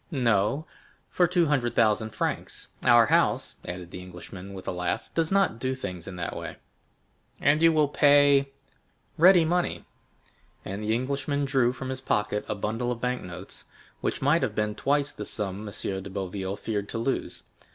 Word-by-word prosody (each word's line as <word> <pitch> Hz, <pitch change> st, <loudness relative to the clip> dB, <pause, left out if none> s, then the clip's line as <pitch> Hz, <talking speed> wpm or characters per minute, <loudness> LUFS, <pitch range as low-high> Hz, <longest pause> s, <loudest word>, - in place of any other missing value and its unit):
"No, 125 Hz, -, +1 dB, 0.5 s
for 175 Hz, -, +3 dB
two 175 Hz, 0 st, +2 dB
hundred 130 Hz, -6 st, 0 dB
thousand 110 Hz, -1 st, +3 dB
francs. 105 Hz, -, -4 dB
Our -, -, +7 dB
house," -, -, +1 dB
added 90 Hz, 0 st, -7 dB
the 90 Hz, -, -7 dB
Englishman 90 Hz, +2 st, -10 dB
with 95 Hz, -, -9 dB
a -, -, 0 dB
laugh, 90 Hz, -1 st, -3 dB
"does 165 Hz, 0 st, 0 dB
not 195 Hz, -12 st, +2 dB
do 130 Hz, +1 st, -1 dB
things 90 Hz, -9 st, -6 dB
in 95 Hz, -, -7 dB
that 85 Hz, -1 st, -4 dB
way." -, -, -6 dB, 0.8 s
"And 145 Hz, +2 st, +3 dB
you 165 Hz, 0 st, +6 dB
will 155 Hz, -2 st, +3 dB
pay——" 140 Hz, -1 st, +5 dB, 0.7 s
"Ready 175 Hz, 0 st, +7 dB
money." 175 Hz, +2 st, -1 dB, 0.8 s
20023m 95 Hz, -, -5 dB
And 100 Hz, +2 st, -5 dB
the 110 Hz, +1 st, +1 dB
Englishman 140 Hz, +3 st, -1 dB
drew 130 Hz, -3 st, +2 dB
from 130 Hz, +1 st, -6 dB
his 130 Hz, 0 st, -4 dB
pocket 105 Hz, -4 st, 0 dB
a 105 Hz, -, -1 dB
bundle 115 Hz, +4 st, -2 dB
of 120 Hz, -, -4 dB
bank 125 Hz, +1 st, -1 dB
notes, 90 Hz, -1 st, -9 dB, 0.3 s
which -, -, -2 dB
might 150 Hz, +5 st, +4 dB
have 110 Hz, -6 st, -1 dB
been 105 Hz, 0 st, 0 dB
twice 145 Hz, +4 st, 0 dB
the 105 Hz, -, -6 dB
sum 105 Hz, 0 st, -4 dB
M. 95 Hz, -1 st, -4 dB
de 100 Hz, -, -8 dB
Boville 95 Hz, 0 st, -4 dB
feared 105 Hz, -1 st, -3 dB
to -, -, -4 dB
lose. 115 Hz, +4 st, -2 dB
120 Hz, 180 wpm, -27 LUFS, 100-145 Hz, 0.8 s, Our